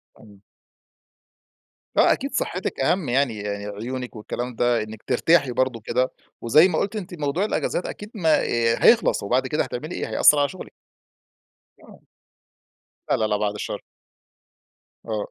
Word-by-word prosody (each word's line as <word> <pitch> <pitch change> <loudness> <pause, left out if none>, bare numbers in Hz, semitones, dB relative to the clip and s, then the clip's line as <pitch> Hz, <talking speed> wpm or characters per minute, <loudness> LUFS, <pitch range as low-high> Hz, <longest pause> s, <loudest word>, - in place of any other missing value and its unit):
امم. 100 -2 -18 1.6
آه - - +6
أكيد - - -5
صحتك - - -2
أهم 175 -8 +1
يعني، 120 -5 0
عيونك 105 +5 -5
والكلام 120 +3 -5
ده 120 -1 +1
إنك 110 0 -10
ترتاحي 140 +1 +2
برضه 125 -1 0
كده، 130 +3 0 0.3
وزي 150 +10 +6
ما 160 -4 -1
قُلْتِ 200 +2 -2
أنتِ 195 -2 -6
موضوع 150 +7 0
الأجازات 180 - -1
أكيد 210 +1 -7
ما 160 -6 +3 0.4
هيخلص، 230 - +4
وبعد 130 +5 +1
كده 150 +3 0
هتعملي 145 +5 -6
إيه؟ - - -4
هيأثر 150 - +5
على 145 -1 +2
شغلك. 185 - -10 1.1
آه. - - -17 1.1
لا، - - +5
لا، 110 - +1
لأ، 105 -1 0
بَعد 105 -1 -1
الشر. 105 - -5 1.2
آه 110 -2 -3
130 Hz, 140 wpm, -23 LUFS, 110-155 Hz, 1.6 s, آه